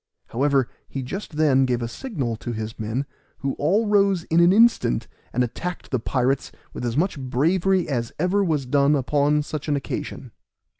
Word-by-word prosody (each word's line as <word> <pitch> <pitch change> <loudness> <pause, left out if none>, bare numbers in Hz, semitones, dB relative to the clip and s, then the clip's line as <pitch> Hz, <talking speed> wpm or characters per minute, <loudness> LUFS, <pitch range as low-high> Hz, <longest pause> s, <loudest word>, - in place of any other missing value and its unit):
However, 135 0 +2 0.2
he 135 - -4
just 175 +5 -6
then 140 -4 +4
gave 125 -2 0
a - - -2
signal 135 - -4
to 120 +2 -5
his 110 +1 -5
men, 110 +6 -2 0.4
who 135 0 -1
all 195 +10 +2
rose 200 -4 +3
in 165 0 +1
an 170 +1 +6
instant, 220 - +3 0.2
and 125 - +1
attacked 170 +9 -5
the 130 - +1
pirates 130 +3 0 0.2
with - - -6
as 120 0 -1
much 170 -2 0
bravery 170 +9 +1
as 120 -5 -2
ever 185 +5 +2
was 155 -7 0
done 140 +3 +3
upon 145 +2 +2
such 155 0 -5
an 145 - +1
occasion. 140 - -5
145 Hz, 180 wpm, -23 LUFS, 125-175 Hz, 0.4 s, an